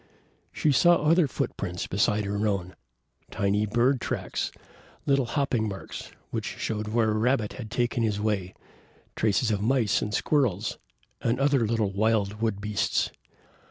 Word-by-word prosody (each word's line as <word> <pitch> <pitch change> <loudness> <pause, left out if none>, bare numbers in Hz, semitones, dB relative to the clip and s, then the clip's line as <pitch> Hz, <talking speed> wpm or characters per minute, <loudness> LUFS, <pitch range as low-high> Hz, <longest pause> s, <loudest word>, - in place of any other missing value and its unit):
She 150 - +1
saw 175 +6 +6
other 165 +1 +3
footprints 90 -7 -3
beside 105 +2 +1
her 100 +2 0
own, 95 -3 -2 0.6
tiny 100 +2 0
bird 120 +4 +2
tracks, - - -2 0.5
little 140 -2 +3
hopping 125 -5 0
marks, 95 -1 -7 0.2
which - - -2
showed 105 -1 -2
where 110 0 +2
a 105 - 0
rabbit 115 -2 +1
had 115 -4 -7
taken 120 +1 0
his 105 -3 0
way, 105 -4 -1 0.6
traces 110 +2 +2
of 100 -2 0
mice 115 -2 +2
and 105 - -2
squirrels 110 - 0 0.4
and 120 +2 0
other 135 -4 +3
little 110 -3 0
wild 105 0 +1
wood 110 -3 0
beasts. 105 0 0
110 Hz, 145 wpm, -27 LUFS, 105-125 Hz, 0.6 s, saw